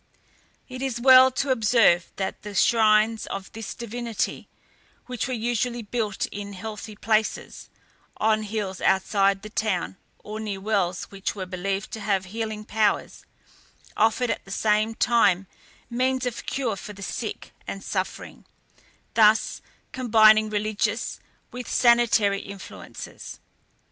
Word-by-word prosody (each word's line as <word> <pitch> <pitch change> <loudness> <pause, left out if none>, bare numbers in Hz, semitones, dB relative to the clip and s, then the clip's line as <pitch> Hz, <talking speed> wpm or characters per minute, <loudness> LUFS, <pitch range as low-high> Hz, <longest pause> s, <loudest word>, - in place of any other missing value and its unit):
It 255 -1 -8
is 260 -3 -2
well 260 +1 +8
to 265 +1 -1
observe 220 -7 +3
that 190 -1 -4
the 205 -1 -8
shrines 220 +1 +3
of 195 -1 -6
this 225 -2 -7
divinity, 235 -1 -4 0.6
which 250 -1 -3
were 255 - -2
usually 240 +1 -1
built 210 -2 -2
in 200 0 -6
healthy 215 +2 -7
places, 215 0 -1 0.5
on 215 0 +2
hills 205 -3 -4
outside 195 +1 +2
the 215 - -7
town, 195 -4 -1 0.2
or 215 +1 -8
near 210 -3 -4
wells 190 -3 0
which 195 +1 -4
were 190 -2 -4
believed 195 +2 -3
to 220 - -5
have 195 -3 0
healing 220 -2 -4
powers, 215 0 0 0.7
offered 225 +3 +2
at - - -4
the - - -16
same 215 +2 +1
time 200 -7 +3 0.4
means 255 +2 0
of 245 -2 -4
cure 250 -6 -1
for 210 +2 -9
the 200 0 -10
sick - - -5 0.2
and - - -6
suffering, - - -4 0.7
thus 215 -1 +4 0.3
combining 220 -3 +5
religious 215 +1 -1 0.3
with 250 -1 -7
sanitary 235 -5 +4
influences. 200 -1 -10
215 Hz, 130 wpm, -25 LUFS, 200-235 Hz, 0.7 s, well